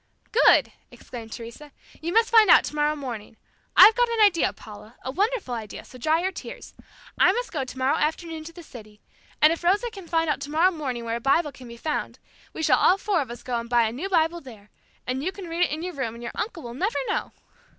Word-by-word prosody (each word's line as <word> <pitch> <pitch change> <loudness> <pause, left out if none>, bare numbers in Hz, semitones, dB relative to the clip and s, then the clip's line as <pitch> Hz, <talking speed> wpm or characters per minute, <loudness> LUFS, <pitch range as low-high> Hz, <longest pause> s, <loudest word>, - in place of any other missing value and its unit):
"Good," - - +5 0.2
exclaimed 230 -3 -10
Teresa, 235 +6 -9 0.3
"you 335 +2 -3
must 455 +3 +3
find 440 -4 +6
out - - +8
tomorrow 300 0 0
morning. 235 -6 -7 0.4
I've 440 - +10
got 485 0 +2
an 465 -1 -2
idea, 400 -6 +4
Paula, 215 +2 -13
a 260 - -4
wonderful 405 - -1
idea, 220 -3 -7
so 255 - -14
dry 315 +6 +1
your 380 - 0
tears. - - -9 0.5
I - - +6
must - - -3
go 295 -5 -2
tomorrow 260 +1 -1
afternoon 320 +1 -2
to 335 - -8
the 345 0 -12
city, 215 -7 -13 0.4
and 310 +2 +7
if 335 - -8
Rosa 410 +7 +1
can 390 -5 -11
find 330 -1 +1
out 300 - 0
tomorrow 320 +6 +2
morning 260 -8 -4
where 230 0 -2
a - - -9
Bible 290 +4 +2
can 255 -2 -13
be 235 0 -10
found, 300 +5 -3 0.3
we 320 - -6
shall - - +4
all 370 - +4
four 400 -4 0
of 265 - -5
us 240 - -9
go 245 -2 -2
and 235 0 -8
buy 240 -1 +4
a 220 - 0
new 305 +12 -5
Bible 340 -1 +1
there, 220 -7 -14 0.3
and 255 +2 -3
you 370 - -1
can 385 -1 -9
read 335 +1 0
it - - -5
in 310 +2 -4
your 360 0 -4
room 255 -5 -4
and 235 - -10
your 235 - -5
uncle 355 -7 -5
will 235 -1 -7
never 380 - -1
know." 425 - -2
305 Hz, 235 wpm, -25 LUFS, 240-360 Hz, 0.5 s, I've